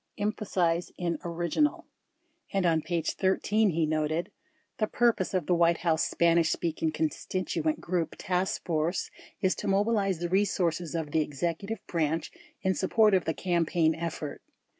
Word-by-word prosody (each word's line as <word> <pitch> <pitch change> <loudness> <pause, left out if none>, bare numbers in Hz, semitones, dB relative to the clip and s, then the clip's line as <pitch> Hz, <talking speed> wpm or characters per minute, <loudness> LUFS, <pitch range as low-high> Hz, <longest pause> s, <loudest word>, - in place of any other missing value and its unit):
[Emphasis 190 -5 0
in 170 -3 -2
orig 170 -1 -3
inal.] 300 0 +2 0.7
And 195 -2 +1
on 165 -2 +3
page 165 0 -1
13 205 +3 +2
he 165 -2 +1
noted: 155 +4 -1 0.5
The 215 - +2
purpose 225 -6 +1
of 180 -4 0
the 180 - +2
White 170 -1 +4
House 160 -1 +3
Spanish 170 -1 +3
Speaking 160 -1 -1
Con 155 0 0
stituent 160 -2 -2
Group 170 -3 -2
Task 185 +1 -1
Force 165 +2 -1 0.3
is 190 -2 +3
to - - -4
mobilize 195 -1 +2
the 175 +1 -3
resources 175 -3 0
of 160 -3 -3
the 160 - +2
Executive 170 +9 -3
Branch 165 -1 -1 0.3
in 190 -1 +2
support 210 +3 +3
of 185 -3 +3
the 160 - -1
campaign 170 -2 +1
effort. 160 -3 -5
170 Hz, 155 wpm, -28 LUFS, 160-190 Hz, 0.7 s, White